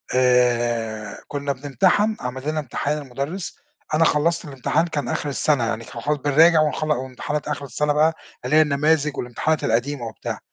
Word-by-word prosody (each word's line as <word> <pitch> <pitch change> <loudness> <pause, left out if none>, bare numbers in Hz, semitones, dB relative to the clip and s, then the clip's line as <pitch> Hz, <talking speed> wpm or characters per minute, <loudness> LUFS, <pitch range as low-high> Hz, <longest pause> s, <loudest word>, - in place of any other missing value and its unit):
آآ، 120 -4 +1
كنا 140 0 -3
بنمتحن، 185 +11 +1
عَمَل 130 +3 -4
لنا 155 0 -1
امتحان 145 +1 -2
المدرس، 145 - -5 0.3
أنا 160 +1 +4
خلصت 165 +4 +1
الامتحان 145 +4 0
كان 150 -3 -3
آخر 155 -2 -2
السنة 140 -2 +1
يعني 115 0 -2
كان 115 - -8
خلا 150 +3 0
بنراجع 155 +4 +5
ونخلّ 155 0 0
وامتحانات 130 +2 -3
آخر 145 -1 -3
السنة 150 +2 0
بقى 155 +2 +3 0.3
اللي 150 - +1
هي 155 - +8
النماذج 150 0 +1
والامتحانات 145 +6 -1
القديمة 120 +3 0
وبتاع، - - -6
145 Hz, 160 wpm, -22 LUFS, 125-155 Hz, 0.3 s, هي